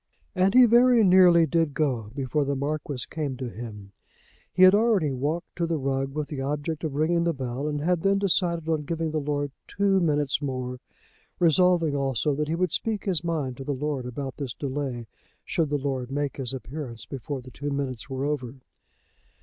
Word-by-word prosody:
And 190 Hz, +2 st, +2 dB
he 255 Hz, -1 st, +9 dB
very 240 Hz, 0 st, +5 dB
nearly 180 Hz, -3 st, +6 dB
did 165 Hz, -3 st, 0 dB
go 125 Hz, -9 st, 0 dB
before 140 Hz, +2 st, 0 dB
the 140 Hz, 0 st, -1 dB
Marquis 140 Hz, -2 st, -3 dB
came 145 Hz, -5 st, -4 dB
to 130 Hz, -1 st, -4 dB
him. 105 Hz, -4 st, -9 dB, 0.6 s
He 185 Hz, -, +4 dB
had 185 Hz, +1 st, +9 dB
already 205 Hz, -8 st, +3 dB
walked 145 Hz, +7 st, -3 dB
to 170 Hz, -1 st, 0 dB
the 165 Hz, -1 st, 0 dB
rug 135 Hz, 0 st, -2 dB
with 150 Hz, -1 st, -2 dB
the 140 Hz, -3 st, -4 dB
object 150 Hz, +4 st, -3 dB
of 150 Hz, -3 st, -3 dB
ringing 170 Hz, +3 st, +2 dB
the 170 Hz, -2 st, 0 dB
bell, 130 Hz, +2 st, -3 dB
and 145 Hz, -1 st, -2 dB
had 175 Hz, +1 st, +1 dB
then 195 Hz, +2 st, +3 dB
decided 175 Hz, -4 st, 0 dB
on 160 Hz, -2 st, +1 dB
giving 165 Hz, 0 st, -2 dB
the 155 Hz, -, 0 dB
lord 145 Hz, -1 st, -2 dB, 0.2 s
two 195 Hz, -1 st, +2 dB
minutes 150 Hz, -5 st, +1 dB
more, 130 Hz, -2 st, -3 dB, 0.6 s
resolving 170 Hz, -2 st, +3 dB
also 140 Hz, +1 st, 0 dB
that 150 Hz, +2 st, -1 dB
he 160 Hz, -, -1 dB
would 180 Hz, -1 st, 0 dB
speak 220 Hz, +2 st, -2 dB
his 180 Hz, -5 st, -1 dB
mind 150 Hz, -7 st, -2 dB
to 135 Hz, -, -6 dB
the 140 Hz, +1 st, -2 dB
lord 140 Hz, -2 st, -3 dB
about 135 Hz, +2 st, -5 dB
this 135 Hz, -5 st, -5 dB
delay, 135 Hz, -4 st, -3 dB, 0.4 s
should 165 Hz, -4 st, 0 dB
the 145 Hz, -, +1 dB
lord 130 Hz, -3 st, -3 dB
make 145 Hz, 0 st, -2 dB
his 130 Hz, -4 st, -3 dB
appearance 130 Hz, -4 st, -7 dB
before 135 Hz, +4 st, -5 dB
the 130 Hz, -, -12 dB
two 145 Hz, +3 st, -5 dB
minutes 140 Hz, -3 st, -3 dB
were 135 Hz, +1 st, -2 dB
over. 135 Hz, -4 st, -3 dB
145 Hz, 195 wpm, -26 LUFS, 135-170 Hz, 0.6 s, he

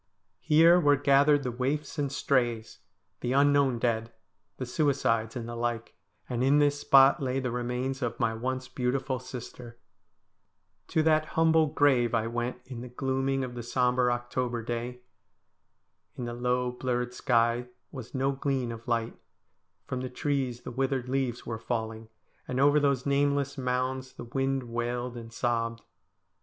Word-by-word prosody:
Here 165 Hz, +3 st, +6 dB
were 145 Hz, -4 st, +5 dB
gathered 145 Hz, +1 st, +4 dB
the 125 Hz, -, -2 dB
waifs 140 Hz, +5 st, -2 dB
and 140 Hz, -2 st, -1 dB
strays; 120 Hz, -5 st, 0 dB, 0.4 s
the 125 Hz, -, -1 dB
unknown 140 Hz, -2 st, +4 dB
dead; 115 Hz, -1 st, -1 dB, 0.5 s
the 130 Hz, -, -4 dB
suicides, 125 Hz, -5 st, 0 dB
and 120 Hz, -2 st, -5 dB
the 120 Hz, -, -6 dB
like; 115 Hz, -1 st, -3 dB, 0.3 s
and 125 Hz, 0 st, -1 dB
in 140 Hz, +2 st, +4 dB
this 145 Hz, -1 st, +3 dB
spot 135 Hz, 0 st, +6 dB
lay 130 Hz, 0 st, -1 dB
the 125 Hz, -2 st, -2 dB
remains 125 Hz, +2 st, -2 dB
of 120 Hz, -2 st, -3 dB
my 115 Hz, -1 st, +1 dB
once 130 Hz, +3 st, -3 dB
beautiful 130 Hz, +1 st, -1 dB
sister. 125 Hz, -2 st, -9 dB, 1.1 s
To 160 Hz, -, +1 dB
that 155 Hz, -1 st, +3 dB
humble 160 Hz, -1 st, +4 dB
grave 135 Hz, -6 st, +3 dB
I 110 Hz, -1 st, +1 dB
went 120 Hz, +2 st, -3 dB
in 125 Hz, -3 st, -7 dB
the 125 Hz, -, -8 dB
gloaming 135 Hz, +1 st, -1 dB
of 125 Hz, -1 st, -5 dB
the 120 Hz, -, -5 dB
sombre 125 Hz, +1 st, +1 dB
October 120 Hz, 0 st, -2 dB
day. 120 Hz, +2 st, -4 dB, 1.1 s
In 125 Hz, -, -5 dB
the 120 Hz, -, -4 dB
low, 125 Hz, +1 st, 0 dB
blurred 125 Hz, 0 st, -2 dB
sky 120 Hz, 0 st, +1 dB, 0.2 s
was 130 Hz, -2 st, -9 dB
no 135 Hz, +1 st, +1 dB
gleam 135 Hz, -3 st, -1 dB
of 115 Hz, +1 st, -9 dB
light; 115 Hz, -1 st, -1 dB, 0.7 s
from 125 Hz, -, -4 dB
the 130 Hz, -, -4 dB
trees 130 Hz, -2 st, -2 dB
the -, -, -7 dB
withered 130 Hz, 0 st, -1 dB
leaves 130 Hz, -3 st, -1 dB
were 115 Hz, -2 st, -4 dB
falling, 110 Hz, -1 st, -4 dB, 0.4 s
and 130 Hz, 0 st, -2 dB
over 145 Hz, +2 st, +5 dB
those 140 Hz, -3 st, +1 dB
nameless 140 Hz, 0 st, +1 dB
mounds 130 Hz, 0 st, -2 dB
the -, -, -9 dB
wind 135 Hz, +2 st, -1 dB
wailed 120 Hz, +1 st, -3 dB
and 115 Hz, -1 st, -8 dB
sobbed. 115 Hz, -1 st, -1 dB
125 Hz, 155 wpm, -28 LUFS, 120-135 Hz, 1.1 s, Here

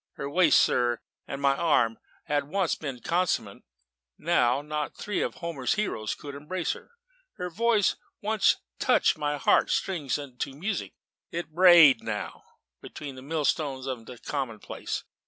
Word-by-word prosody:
Her 140 Hz, -, -5 dB
waist, 165 Hz, +2 st, +5 dB
sir, 120 Hz, -1 st, +2 dB, 0.3 s
and 140 Hz, -, -5 dB
my 140 Hz, -1 st, +3 dB
arm 120 Hz, -8 st, +2 dB, 0.2 s
had 145 Hz, -1 st, 0 dB
once 185 Hz, +3 st, 0 dB
been 135 Hz, -5 st, -5 dB
commensurate: 175 Hz, +5 st, -1 dB, 0.6 s
now 140 Hz, -5 st, +2 dB
not 150 Hz, 0 st, -3 dB
three 205 Hz, -2 st, -2 dB
of -, -, -2 dB
Homer's 165 Hz, -7 st, -2 dB
heroes 150 Hz, -, -2 dB
could 145 Hz, -1 st, -9 dB
embrace 160 Hz, +5 st, -3 dB
her. -, -, -9 dB, 0.4 s
Her 180 Hz, 0 st, -5 dB
voice 220 Hz, +2 st, +2 dB
could -, -, -26 dB, 0.2 s
once 215 Hz, -1 st, +3 dB, 0.2 s
touch -, -, +3 dB
my 145 Hz, 0 st, -2 dB
heart -, -, +3 dB
strings 160 Hz, -9 st, -1 dB
into 135 Hz, -1 st, -6 dB
music; 195 Hz, +6 st, -3 dB, 0.3 s
it 170 Hz, -2 st, -5 dB
brayed 170 Hz, -7 st, +8 dB
them -, -, -14 dB
now, 105 Hz, -2 st, -4 dB, 0.4 s
between 145 Hz, -2 st, -8 dB
the 130 Hz, -, -10 dB
millstones 145 Hz, -2 st, -1 dB
of 125 Hz, -4 st, -5 dB
the 125 Hz, -, -9 dB
commonplace. 125 Hz, -5 st, -4 dB
150 Hz, 155 wpm, -27 LUFS, 135-175 Hz, 0.6 s, brayed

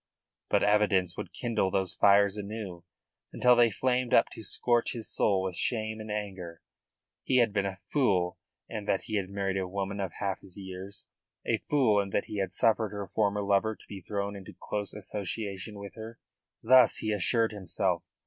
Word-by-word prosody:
But -, -, +3 dB
evidence 100 Hz, -4 st, +3 dB
would 90 Hz, -, -6 dB
kindle 110 Hz, -1 st, 0 dB
those 95 Hz, -1 st, 0 dB
fires 100 Hz, 0 st, +5 dB
anew 100 Hz, -4 st, -6 dB, 0.5 s
until 125 Hz, 0 st, +4 dB
they 120 Hz, -1 st, +5 dB
flamed 125 Hz, +3 st, +1 dB
up -, -, +5 dB
to -, -, -9 dB
scorch 120 Hz, +2 st, +1 dB
his 115 Hz, -3 st, -5 dB
soul 95 Hz, -2 st, +1 dB
with 95 Hz, -2 st, -3 dB
shame 110 Hz, 0 st, 0 dB
and 110 Hz, 0 st, -8 dB
anger. 95 Hz, -5 st, -5 dB, 0.6 s
He 130 Hz, -, +2 dB
had 115 Hz, -4 st, +3 dB
been 100 Hz, -1 st, +1 dB
a 95 Hz, -1 st, -5 dB
fool 95 Hz, -11 st, +1 dB, 0.3 s
in 105 Hz, -2 st, -5 dB
that 95 Hz, -, 0 dB
he 110 Hz, -, -2 dB
had 95 Hz, -2 st, -2 dB
married 100 Hz, -1 st, -2 dB
a 95 Hz, -1 st, -1 dB
woman 100 Hz, +1 st, -3 dB
of 95 Hz, -4 st, -3 dB
half 100 Hz, -2 st, -3 dB
his 95 Hz, 0 st, -12 dB
years; 95 Hz, +1 st, -7 dB, 0.4 s
a -, -, +1 dB
fool 125 Hz, -8 st, +4 dB
in 100 Hz, -1 st, -1 dB
that 100 Hz, -, 0 dB
he 105 Hz, -, -6 dB
had 95 Hz, -, -1 dB
suffered 110 Hz, -1 st, +2 dB
her 100 Hz, -1 st, -4 dB
former 105 Hz, 0 st, 0 dB
lover 100 Hz, +2 st, +2 dB
to -, -, -20 dB
be 100 Hz, -2 st, -8 dB
thrown 100 Hz, +2 st, -3 dB
into 95 Hz, -3 st, -10 dB
close 105 Hz, -1 st, -3 dB
association 105 Hz, 0 st, -4 dB
with 100 Hz, 0 st, -8 dB
her. 115 Hz, +1 st, -9 dB, 0.5 s
Thus 125 Hz, 0 st, +6 dB
he 110 Hz, -, -2 dB
assured 110 Hz, +3 st, +2 dB
himself. 95 Hz, -3 st, -1 dB
100 Hz, 185 wpm, -29 LUFS, 95-110 Hz, 0.6 s, Thus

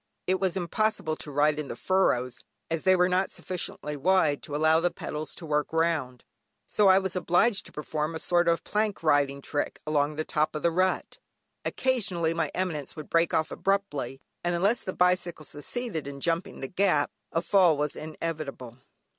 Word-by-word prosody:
It 185 Hz, +1 st, +1 dB
was 190 Hz, -1 st, 0 dB
impossible 180 Hz, -2 st, 0 dB
to -, -, -7 dB
ride 150 Hz, +1 st, +2 dB
in 150 Hz, -, -4 dB
the -, -, -5 dB
furrows, 125 Hz, -10 st, +1 dB, 0.3 s
as 165 Hz, -1 st, 0 dB
they 185 Hz, 0 st, +6 dB
were 180 Hz, 0 st, +4 dB
not 185 Hz, +1 st, +1 dB
sufficiently 160 Hz, -4 st, -4 dB
wide 155 Hz, -1 st, +2 dB
to 145 Hz, -, -6 dB
allow 155 Hz, +1 st, +4 dB
the 175 Hz, +1 st, +2 dB
pedals 155 Hz, -2 st, -5 dB
to 170 Hz, -, -8 dB
work 150 Hz, -1 st, 0 dB
round, 160 Hz, -7 st, 0 dB, 0.4 s
so 210 Hz, -, +3 dB
I 190 Hz, 0 st, +7 dB
was 190 Hz, -1 st, -1 dB
obliged 185 Hz, +5 st, +2 dB
to -, -, -14 dB
perform 150 Hz, +1 st, -3 dB
a -, -, -1 dB
sort 175 Hz, +1 st, +2 dB
of 170 Hz, 0 st, +2 dB
plank 210 Hz, -3 st, -1 dB
riding 140 Hz, -2 st, +2 dB
trick 145 Hz, -, -2 dB
along 150 Hz, -1 st, +1 dB
the 155 Hz, +1 st, -2 dB
top 155 Hz, +1 st, 0 dB
of 155 Hz, -, -4 dB
the 170 Hz, -, +3 dB
rut. 185 Hz, +2 st, 0 dB, 0.5 s
Occasionally, 195 Hz, -11 st, 0 dB
my 165 Hz, -3 st, -1 dB
eminence 165 Hz, -7 st, -3 dB
would 155 Hz, -2 st, -9 dB
break 165 Hz, 0 st, +3 dB
off 160 Hz, -, +1 dB
abruptly, 195 Hz, -10 st, -1 dB, 0.2 s
and 175 Hz, 0 st, 0 dB
unless 200 Hz, +7 st, +2 dB
the 185 Hz, -, -4 dB
bicycle 180 Hz, -3 st, +1 dB
succeeded 165 Hz, -, -4 dB
in 140 Hz, 0 st, -7 dB
jumping 165 Hz, +5 st, -2 dB
the 135 Hz, -, -3 dB
gap 180 Hz, -3 st, +2 dB, 0.2 s
a 165 Hz, -, 0 dB
fall 180 Hz, -4 st, +4 dB
was 150 Hz, 0 st, -1 dB
inevitable. 155 Hz, -6 st, -6 dB
165 Hz, 185 wpm, -27 LUFS, 150-185 Hz, 0.5 s, I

